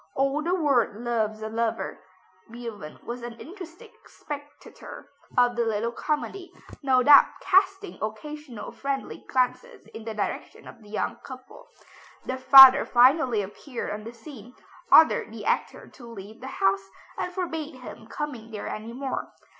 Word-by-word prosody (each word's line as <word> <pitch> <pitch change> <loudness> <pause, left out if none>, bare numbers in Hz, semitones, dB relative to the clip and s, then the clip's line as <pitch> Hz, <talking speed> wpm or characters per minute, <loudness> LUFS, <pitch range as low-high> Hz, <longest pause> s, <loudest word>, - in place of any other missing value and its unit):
"All 275 +2 +1
the 345 +4 0
world 275 - +1
loves 220 -2 -2
a - - -3
lover." 225 0 -3 0.5
Beethoven 230 -9 -8
was 240 +1 -6
an 235 -1 -8
interested 350 0 -11 0.2
spectator 290 -1 -10 0.3
of 245 -1 +4
the 235 - +1
little 225 +1 -1
comedy, 315 +8 -4 0.3
no 260 -3 +3
doubt 285 +1 +8
casting 390 +1 +1
occasional 245 +3 -7
friendly 275 -1 -5
glances 265 - -1
in 225 - -9
the 220 -1 -6
direction 210 - -5
of - - -13
the 210 - -16
young 215 - -3
couple. 255 -1 -13 0.6
The 260 - -3
father 265 +1 +10
finally 245 -3 +4
appeared 235 +6 -7
on 210 +1 -6
the 230 - -8
scene, 245 0 -13 0.4
ordered 315 -8 +6
the 220 -2 -9
actor - - -1
to 240 - -14
leave 215 +1 -11
the 260 - -7
house, 195 -5 0 0.3
and 360 - -3
forbade 325 -5 -4
him 245 -3 -11
coming 245 -5 -6
there 215 -2 -6
any 220 +2 -7
more. 265 +1 -4
250 Hz, 150 wpm, -26 LUFS, 225-290 Hz, 0.6 s, father